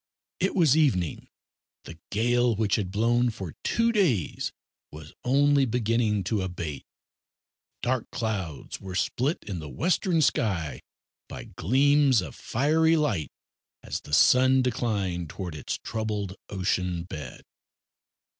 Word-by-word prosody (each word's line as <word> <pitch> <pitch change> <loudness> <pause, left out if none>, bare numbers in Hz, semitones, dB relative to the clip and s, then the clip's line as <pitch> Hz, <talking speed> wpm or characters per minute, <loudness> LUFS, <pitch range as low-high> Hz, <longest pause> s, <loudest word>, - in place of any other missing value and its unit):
It 190 - 0
was 160 -7 +5
evening. 110 - +1 0.6
The 80 0 -11
gale, 120 +2 +2
which 105 0 +1
had 100 -4 -2
blown 120 +4 +2
for 95 -8 -6
two 230 0 +2
days 160 - 0 0.4
was 75 0 -11
only 140 +2 +4
beginning 115 -3 +1
to 100 +2 -1
abate. 85 -6 -5 1.0
Dark 125 -1 -1
clouds 95 - -4
were 95 -1 -7
split 135 - -1
in 95 -5 -5
the 75 -2 -7
western 175 - +1
sky 95 - 0 0.5
by - - -7
gleams 135 - +3
of 75 - -8
fiery 160 +6 +2
light 105 - 0 0.5
as - - -4
the - - -13
sun 130 - +5
declined 100 -9 -1
towards 90 -2 -6
its 75 - -4
troubled 105 -4 -3
ocean 90 -3 -1
bed. 75 -7 -8
110 Hz, 125 wpm, -27 LUFS, 90-130 Hz, 1.0 s, was